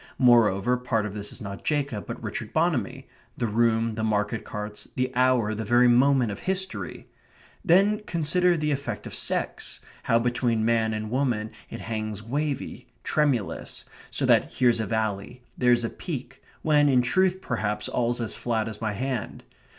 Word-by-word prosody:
Moreover, 120 -2 +4
part 115 -4 -1
of 105 - -5
this 105 -1 -4
is - - -7
not 100 -1 -7
Jacob 140 -8 -1
but - - -6
Richard - - -5
Bonamy - - 0 0.3
the 120 - 0
room; 115 0 +2
the 110 0 -3
market 105 +1 0
carts; 105 0 -6
the 130 0 0
hour; 125 -4 +3
the 110 +1 -3
very 120 +3 +4
moment 125 -1 +4
of 100 - -6
history. 190 +1 -3 0.6
Then 200 +3 +4
consider 175 +2 +2
the 150 -1 0
effect 140 0 -3
of - - -7
sex - - -2 0.2
how 115 - +2
between 120 -1 +1
man 110 -1 +2
and 110 0 -4
woman 120 -5 0 0.2
it - - -7
hangs 110 -2 -4
wavy, 140 +4 -3 0.2
tremulous, 140 -9 -1 0.2
so - - -1
that - - +3
here's 120 -2 +3
a 110 - -1
valley, 110 +1 -2
there's 120 -1 +3
a 115 - -1
peak, 130 -7 -6 0.2
when 150 -2 +4
in 125 -2 +4
truth, 185 +8 +2
perhaps, 105 - -2
all's 120 0 0
as 115 -3 0
flat 115 -2 -1
as 110 -1 -7
my 110 -2 -1
hand. 125 +1 -4
120 Hz, 165 wpm, -26 LUFS, 110-135 Hz, 0.6 s, Moreover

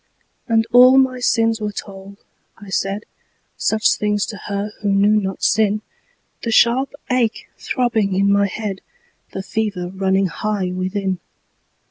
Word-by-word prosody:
And 225 -2 +2
all 255 +2 +7
my 260 -1 +3
sins 225 -2 +1
were 210 0 -2
told; 200 -1 -9 0.4
I 200 -2 -12
said 195 +2 -2 0.5
Such 220 0 +2
things 210 -1 0
to 205 - -7
her 200 +1 -3
who 205 - 0
knew 205 +2 +3
not 190 -1 -5
sin 210 +1 +2 0.6
The 230 - -3
sharp 240 +5 +3 0.2
ache 240 -3 0
throbbing 220 -6 0
in 200 +1 +3
my 200 0 +3
head, 200 -1 -5 0.5
The 190 - -4
fever 200 -4 -3
running 190 0 +1
high 190 +1 -2
within. 185 0 -2
210 Hz, 140 wpm, -19 LUFS, 195-225 Hz, 0.6 s, all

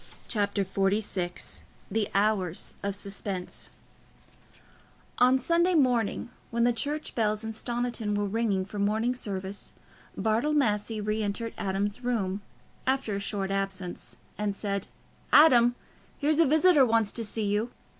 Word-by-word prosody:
Chapter 205 -2 0
XLVI 195 -2 -1 0.3
The 220 -2 0
Hours 195 -4 +1
of 200 -1 -2
Suspense 195 -2 -5 1.5
On 255 +1 +6
Sunday 340 +6 +2
morning, 245 -6 +2 0.2
when 235 0 +1
the 240 0 +4
church 295 +6 -2
bells 215 -1 0
in 225 - -3
Stoniton 235 -2 -2
were 205 0 0
ringing 200 -2 0
for 205 +1 -7
morning 220 +4 +1
service, 200 -4 -5 0.4
Bartle 225 +9 +1
Massey 220 -5 +1
re 215 +1 -1
entered 215 +2 -2
Adam's 200 +4 -2
room, 205 -5 -1 0.5
after 265 -5 +1
a - - -1
short 200 -1 -2
absence, 195 -2 -3 0.2
and 205 -1 -1
said, 200 -1 -2 0.4
"Adam, 245 -6 +7 0.4
here's 300 +2 +2
a 330 - +6
visitor 315 0 +6
wants 225 -3 +3
to 230 - -4
see 215 0 -2
you." 210 +4 0
215 Hz, 135 wpm, -28 LUFS, 200-245 Hz, 1.5 s, Adam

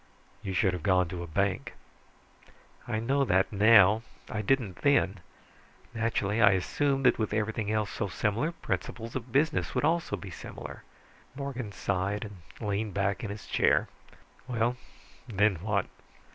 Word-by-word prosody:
"You 95 - -4
should 95 -1 +3
have 90 - -4
gone 90 0 +3
to 90 0 -5
a 85 - -6
bank." 100 +3 -1 1.1
"I 110 -2 -1
know 135 +5 +1
that 95 -4 +2
now. 105 0 +6 0.3
I 105 - -2
didn't 110 -5 0
then. 120 -9 +2 0.7
Naturally, 115 -2 0
I 100 -3 +7
assumed 135 +8 0
that 125 - +4
with 110 -1 -1
everything 110 0 -1
else 110 -1 0
so 105 - -2
similar, 110 - -1
principles 115 - -4
of 125 -1 -5
business 145 +6 +1
would - - +2
also 170 +1 +1
be 100 - -9
similar." - - -8 0.5
Morgan 130 -6 -5
sighed 100 +2 -2
and 100 -4 -11 0.3
leaned 105 0 -2
back 100 +4 0
in 110 - -3
his 100 0 -7
chair. - - +2 0.6
"Well, 120 0 0 0.5
then 105 -3 +2
what?" 100 +2 0
105 Hz, 150 wpm, -29 LUFS, 100-115 Hz, 1.1 s, I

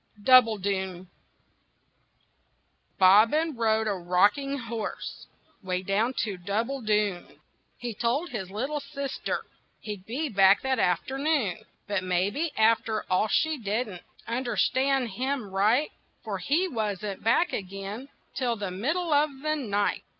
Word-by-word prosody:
DOUBBLEDOON 200 -7 +3 1.9
Bobbin 225 - +5
rode 220 -1 +1
a 210 - 0
rocking 200 +10 +2
horse 230 -3 -6 0.3
'Way 185 -2 -2
down 215 +7 0
to 200 -4 -5
Doubbledoon, 210 -1 -1 0.4
He 240 -2 -5
told 250 - -1
his 195 -6 -4
little 265 +9 -3
sister 280 -2 -4 0.4
He'd 205 -3 -7
be 275 +8 -2
back 195 -4 +5
that 265 -1 0
afternoon. 240 - 0 0.2
But 200 -2 -1
maybe 195 - 0
after 220 0 +2
all 185 +4 +3
she 315 +7 +1
didn't 210 -3 -3 0.3
Understand 260 +2 +1
him 255 +2 -2
right, 215 +10 +2 0.3
For 205 -4 -4
he 325 - +1
wasn't 210 - -3
back 240 +10 +2
again 195 +5 -5 0.3
Till 245 -3 0
the 200 -3 -4
middle 310 - -1
of 295 +1 +4
the 310 0 +1
night. 205 -8 -1
220 Hz, 120 wpm, -27 LUFS, 195-265 Hz, 1.9 s, Bobbin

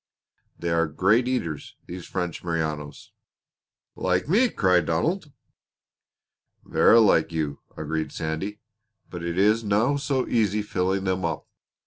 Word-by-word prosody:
They 85 - -3
are 85 -1 +2
great 105 +10 +2
eaters, 85 - -3
these 90 0 -8
French 90 -3 -4
Merinos." 80 -4 -3 0.8
"Like 90 +3 0
me!" 230 - +4
cried 90 - +2
Donald. 150 - 0 1.3
"Verra 115 - +5
like 95 -7 +4
you!" 75 -3 -2 0.2
agreed 80 +1 -3
Sandy. 85 +7 -4 0.5
"But 90 - -6
it 85 0 -3
is 105 +4 +3
no 110 +7 +2
so 140 -2 -1
easy 105 -3 +1
filling 95 -1 -1
them 95 -1 -1
up. 80 -2 -2
90 Hz, 125 wpm, -25 LUFS, 80-110 Hz, 1.3 s, Verra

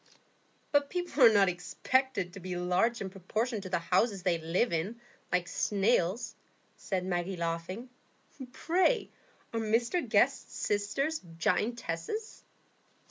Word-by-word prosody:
"But 285 -1 +3
people 355 -4 -2
are 230 - +10
not 200 -2 +5
expected 195 +2 0
to 195 - -8
be 180 0 -5
large 180 +7 +1
in 190 -1 -4
proportion 215 +4 -2
to 190 - -7
the 180 - +1
houses 185 +3 +1
they 175 -3 +2
live 170 +7 0
in, 195 +9 -2 0.3
like 180 -1 +1
snails," 200 +1 +1 0.4
said 185 -2 -3
Maggie, 180 0 -2
laughing. 170 +7 -3 0.6
"Pray, 370 - +1 0.4
are 230 - 0
Mr 230 +9 +1
Guest's - - +2
sisters 215 +10 -1 0.2
giantesses?" 230 - -2
200 Hz, 125 wpm, -31 LUFS, 180-240 Hz, 0.6 s, are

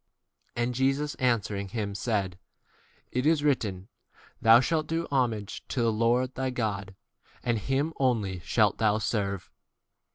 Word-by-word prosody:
And 120 +1 0
Jesus 135 +3 +1
answering 105 -5 0
him 100 0 -3
said, 100 -4 -2 0.7
c 125 - +1
It 130 - +1
is 155 -2 +3
written, 105 -10 0 0.5
Thou 115 +1 +8
shalt 155 +4 0
do 165 +1 -1
homage 115 -7 0
to 125 - -1
[the] 115 - +3
Lord 120 +3 +2
d 130 - -5
thy 130 - 0
God, 105 -5 -3 0.5
and 120 -2 +1
him 140 +7 -1
only 110 -8 +1
shalt 105 +4 +2
thou 110 -1 +3
serve. 100 -3 -2
115 Hz, 150 wpm, -28 LUFS, 100-130 Hz, 0.7 s, Thou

